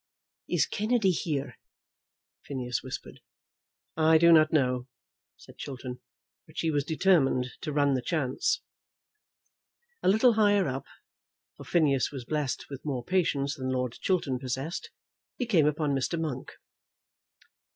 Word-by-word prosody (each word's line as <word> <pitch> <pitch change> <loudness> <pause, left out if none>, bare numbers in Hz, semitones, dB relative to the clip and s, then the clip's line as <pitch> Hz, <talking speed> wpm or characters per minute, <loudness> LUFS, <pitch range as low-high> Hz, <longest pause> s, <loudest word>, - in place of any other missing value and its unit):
"Is - - +3
Kennedy 215 -2 +1
here?" 150 -5 -3 0.9
Phineas 125 -4 -3
whispered. - - -8 0.8
"I 160 0 +5
do 170 +1 +6
not 155 -1 +6
know," 125 -4 +1 0.5
said - - -16
Chiltern, 125 -2 -6 0.5
"but 155 - -18
she 165 - 0
was 145 -2 +1
determined 150 -6 +2
to 150 - -3
run 145 -1 +2
the 130 - 0
chance." 155 - 0 1.4
A - - -1
little 220 +5 +5
higher 205 -3 +3
up, 135 0 -4 0.7
for - - -11
Phineas 145 -6 +2
was 135 -4 -7
blessed 150 -1 -2
with 140 -2 -8
more 135 -5 -3
patience 145 -7 +1
than 130 -3 -4
Lord 125 -2 -1
Chiltern 155 -9 0
possessed, 135 +5 -4 0.5
he 250 - -1
came 175 -10 +3
upon 150 0 0
Mr. 135 +5 -1
Monk. 145 -6 -4
150 Hz, 130 wpm, -28 LUFS, 130-170 Hz, 1.4 s, do